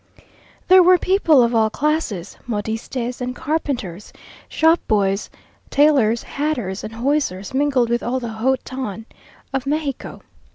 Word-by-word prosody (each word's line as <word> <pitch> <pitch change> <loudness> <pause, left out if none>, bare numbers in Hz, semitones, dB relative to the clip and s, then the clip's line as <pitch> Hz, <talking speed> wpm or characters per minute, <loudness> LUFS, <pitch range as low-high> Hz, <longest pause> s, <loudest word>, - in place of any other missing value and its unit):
There 370 0 +8
were 365 +1 +6
people 335 -8 +4
of 235 +1 +1
all 220 -1 +3
classes; 265 - -2
modistes 235 +3 -4
and 250 0 -3
carpenters, 245 - -3 0.4
shop 325 +1 +3
boys, 195 -1 +1 0.4
tailors, 270 -6 +3
hatters, 250 -10 -3
and 215 - -7
hosiers, 235 -6 -1
mingled 265 -3 +1
with 240 - +1
all 255 +2 -1
the 240 -2 -5
haut 245 +4 0
ton 225 -5 -5 0.5
of 270 0 -2
Mexico. 290 -2 -3
250 Hz, 130 wpm, -20 LUFS, 220-290 Hz, 0.5 s, There